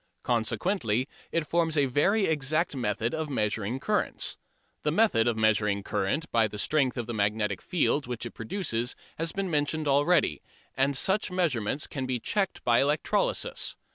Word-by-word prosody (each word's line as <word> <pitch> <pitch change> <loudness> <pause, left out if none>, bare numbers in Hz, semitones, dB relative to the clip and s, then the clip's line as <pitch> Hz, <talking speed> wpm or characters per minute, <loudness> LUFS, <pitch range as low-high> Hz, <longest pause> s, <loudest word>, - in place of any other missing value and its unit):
Consequently 120 - 0 0.2
it 165 -2 0
forms 165 -1 +1
a 145 - +4
very 195 - +2
exact 155 +1 0
method 115 -1 -1
of 160 -1 -2
measuring 110 -1 -1
currents. 210 +8 -1 0.5
The - - 0
method 210 - +3
of 115 -2 +1
measuring 105 -2 +2
current 140 +16 -1
by 115 -1 +3
the 105 - -8
strength 135 +3 +1
of 120 - -2
the 120 - -5
magnetic 105 -1 0
field 150 -4 0
which 120 -1 -4
it 120 - -5
produces 120 - -2 0.2
has 165 0 0
been 195 -2 -3
mentioned 150 +1 0
already, 145 - +3 0.3
and 135 0 +2
such 195 +9 +2
measurements 150 - 0
can 130 -2 -4
be 125 -1 -1
checked 195 - -1
by 120 -1 +4
electrolysis. - - 0
135 Hz, 160 wpm, -28 LUFS, 115-165 Hz, 0.5 s, a